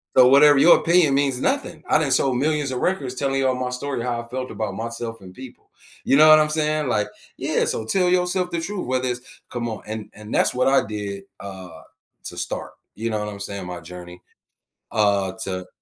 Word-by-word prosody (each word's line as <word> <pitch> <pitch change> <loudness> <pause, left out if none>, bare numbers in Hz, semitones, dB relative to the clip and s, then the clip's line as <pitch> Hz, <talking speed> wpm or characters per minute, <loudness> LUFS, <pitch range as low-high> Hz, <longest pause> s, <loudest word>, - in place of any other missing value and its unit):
So 125 -1 +7
whatever 145 +1 +7
your 165 +5 +7
opinion 170 -4 +3
means 135 -2 +1
nothing, - - -2
I - - +5
done - - 0
sold 130 -2 +2
millions 150 0 0
of 125 - -3
records 140 -9 -1
telling 135 +1 -1
you 135 -1 +2
all 130 - 0
my 125 0 -3
story, 130 0 -3
how 120 -1 -2
I 115 - -13
felt 130 +1 -4
about 105 -3 -4
myself 115 +1 -5
and 95 -2 -13
people." 130 +3 -13 0.4
You - - +3
know 155 +2 +7
what 155 0 +9
I'm 155 0 +2
saying? 155 -1 0
Like, 105 -4 0 0.3
yeah, - - 0
so - - -2
tell 180 +9 +2
yourself 180 0 +1
the 170 - -2
truth, 190 -1 -4
whether 130 0 0
it's 125 0 -7
come 120 -1 -4
on, 110 - -6
and 110 -1 -6
and 105 +1 -10
that's - - +2
what 125 +1 +2
I 135 - +3
did, 100 -2 -5 0.2
uh, 95 -4 -9 0.4
to - - -7
start, - - -4 0.2
you 115 +2 -3
know 110 -1 -1
what 105 - -4
I'm 100 -1 -7
saying? 100 -2 -6
My 90 -1 -7
journey, 90 +1 -11 0.7
uh, 100 -3 +1
to 95 -1 -4
125 Hz, 220 wpm, -22 LUFS, 105-145 Hz, 0.7 s, what